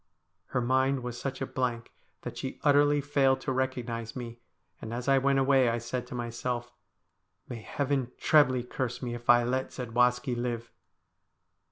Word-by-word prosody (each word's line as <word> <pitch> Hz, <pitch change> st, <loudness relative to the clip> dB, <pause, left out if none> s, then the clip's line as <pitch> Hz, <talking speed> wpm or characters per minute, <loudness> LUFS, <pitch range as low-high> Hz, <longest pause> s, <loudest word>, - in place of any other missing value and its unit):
Her 125 Hz, -, -1 dB
mind 130 Hz, +1 st, +1 dB
was 120 Hz, -1 st, -5 dB
such 135 Hz, -1 st, -4 dB
a -, -, 0 dB
blank 120 Hz, -3 st, -3 dB, 0.3 s
that -, -, -6 dB
she 130 Hz, -, -5 dB
utterly 145 Hz, 0 st, +4 dB
failed 135 Hz, -2 st, +2 dB
to -, -, -2 dB
recognise 120 Hz, -3 st, -2 dB
me, 120 Hz, -2 st, -7 dB, 0.4 s
and 115 Hz, +1 st, -5 dB
as 125 Hz, +2 st, -5 dB
I 135 Hz, 0 st, +5 dB
went 135 Hz, +1 st, +2 dB
away 135 Hz, -2 st, +4 dB
I 115 Hz, -, 0 dB
said 120 Hz, +1 st, -4 dB
to -, -, -7 dB
myself, 120 Hz, 0 st, -4 dB, 0.4 s
' -, -, -49 dB
May 115 Hz, -3 st, -7 dB
Heaven 135 Hz, 0 st, -1 dB
trebly 130 Hz, -5 st, +4 dB
curse 125 Hz, 0 st, -4 dB
me 120 Hz, -1 st, -3 dB
if 120 Hz, 0 st, -8 dB
I 120 Hz, 0 st, +7 dB
let 130 Hz, +2 st, -1 dB
Zadwaski 125 Hz, +1 st, +1 dB
live 120 Hz, -1 st, -3 dB
125 Hz, 170 wpm, -29 LUFS, 120-135 Hz, 0.4 s, I